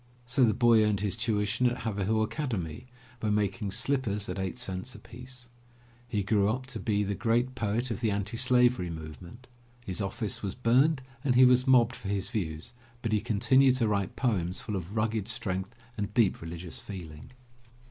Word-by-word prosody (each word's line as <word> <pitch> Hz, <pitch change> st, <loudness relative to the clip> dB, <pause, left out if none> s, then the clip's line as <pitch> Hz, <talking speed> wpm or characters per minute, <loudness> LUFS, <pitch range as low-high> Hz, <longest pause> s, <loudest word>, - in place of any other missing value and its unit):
So 125 Hz, +2 st, +2 dB
the 110 Hz, -3 st, +4 dB
boy 120 Hz, -3 st, +5 dB
earned 105 Hz, -2 st, +1 dB
his 105 Hz, -2 st, 0 dB
tuition 110 Hz, +1 st, +1 dB
at 120 Hz, -, -4 dB
Haverhill 110 Hz, 0 st, 0 dB
Academy 110 Hz, -, -3 dB, 0.3 s
by 110 Hz, -, -1 dB
making 105 Hz, 0 st, 0 dB
slippers 115 Hz, -2 st, 0 dB
at -, -, -3 dB
eight 95 Hz, +3 st, -3 dB
cents 120 Hz, 0 st, -5 dB
apiece. 125 Hz, 0 st, -11 dB, 0.6 s
He 105 Hz, -4 st, -1 dB
grew 100 Hz, 0 st, +2 dB
up 130 Hz, +4 st, -2 dB
to -, -, -5 dB
be 105 Hz, -2 st, +1 dB
the 100 Hz, 0 st, -1 dB
great 120 Hz, +4 st, +1 dB
poet 120 Hz, +1 st, -1 dB
of 110 Hz, -, -3 dB
the 115 Hz, -, +2 dB
anti 100 Hz, +2 st, -2 dB
Slavery 125 Hz, -5 st, +3 dB
movement. 85 Hz, +9 st, -9 dB, 0.4 s
His 95 Hz, 0 st, -3 dB
office 100 Hz, +2 st, -3 dB
was 100 Hz, -1 st, -4 dB
burned 130 Hz, +4 st, +3 dB, 0.2 s
and 130 Hz, -4 st, +2 dB
he 130 Hz, +1 st, +8 dB
was 125 Hz, +1 st, +4 dB
mobbed 125 Hz, -1 st, +5 dB
for -, -, -8 dB
his 100 Hz, -1 st, -2 dB
views, 80 Hz, -3 st, -3 dB, 0.3 s
but 115 Hz, -, -1 dB
he 105 Hz, -1 st, +2 dB
continued 125 Hz, +4 st, +4 dB
to 120 Hz, -3 st, +1 dB
write 100 Hz, -3 st, -1 dB
poems 95 Hz, -8 st, 0 dB
full 105 Hz, -, -4 dB
of 95 Hz, +2 st, -5 dB
rugged 110 Hz, -2 st, 0 dB
strength 105 Hz, -3 st, -3 dB, 0.2 s
and 100 Hz, 0 st, -2 dB
deep 115 Hz, -6 st, +3 dB
religious 85 Hz, +1 st, -7 dB
feeling. 80 Hz, -7 st, -9 dB
110 Hz, 180 wpm, -29 LUFS, 100-125 Hz, 0.6 s, he